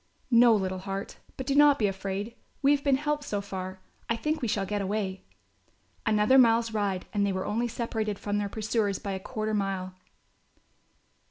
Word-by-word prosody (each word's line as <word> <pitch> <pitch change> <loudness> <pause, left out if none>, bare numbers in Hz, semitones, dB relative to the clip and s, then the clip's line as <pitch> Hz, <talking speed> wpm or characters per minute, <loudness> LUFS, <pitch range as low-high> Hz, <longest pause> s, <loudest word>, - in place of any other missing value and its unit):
"No, 235 -1 +7
little 190 -2 -1
heart, 195 +1 -5 0.2
but 260 - -4
do 275 - 0
not 290 0 +6
be 215 - +1
afraid, 195 +3 -3 0.3
we 280 - +5
have 285 -1 +2
been 280 -2 +4
helped 295 +1 -1
so 205 -7 -2
far. 190 -1 -6 0.3
I 230 - +2
think 305 +7 -2
we 240 - 0
shall 200 -2 0
get 205 +1 -2
away." 195 -1 -3 0.8
Another 215 +4 +5
mile's 230 -2 +4
ride 200 -3 -1
and 205 -1 +1
they 200 - +1
were 185 0 -2
only 235 +3 0
separated 220 -3 -3
from 205 0 -2
their 205 -1 -2
pursuers 215 -2 -1
by 200 - -5
a 190 - -3
quarter 215 +1 -3
mile. 195 -2 -2
210 Hz, 185 wpm, -28 LUFS, 195-235 Hz, 0.8 s, No